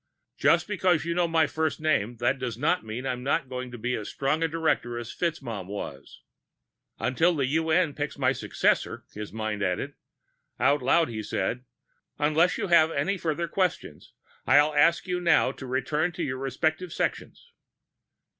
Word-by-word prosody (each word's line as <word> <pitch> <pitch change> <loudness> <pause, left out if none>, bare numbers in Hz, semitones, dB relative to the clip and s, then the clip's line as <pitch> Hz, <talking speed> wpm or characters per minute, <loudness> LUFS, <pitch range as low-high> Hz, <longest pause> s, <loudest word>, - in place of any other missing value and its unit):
"Just - - +3
because 185 -6 +1
you 170 - -1
know 175 0 +2
my 165 -1 +3
first 160 +2 -1
name, 120 -8 +1
that 120 +3 0
doesn't 125 +8 0
mean 110 +4 -6
I'm 125 -2 -2
not 135 0 0
going 130 0 -5
to 120 - -8
be 125 +2 -2
as 105 -4 -4
strong 140 +4 -1
a 165 - +3
director 155 -7 -1
as 120 -1 -6
FitzMaugham 125 - -3
was." 100 +1 -8 0.7
Until 165 +7 +2
the 140 -3 +1
UN 160 +3 +1
picks 145 +1 -4
my 130 -2 +2
successor, 135 - 0
his 105 0 -7
mind 110 -1 -3
added. 95 -2 -1 0.7
Out 140 +4 +3
loud 160 +4 +3
he 110 -2 -4
said, 115 +4 -2 0.5
"Unless 155 +5 +2
you - - -2
have 170 -3 +5
any 165 +6 0
further 170 -1 -2
questions, 175 - -2 0.3
I'll 145 +3 +5
ask 155 +3 +4
you 180 -1 -2
now 170 -6 +4
to 130 -1 -9
return 150 +6 0
to 170 - -3
your 130 -3 -3
respective 160 +6 -1
sections." 475 - -4
145 Hz, 165 wpm, -27 LUFS, 125-165 Hz, 0.7 s, have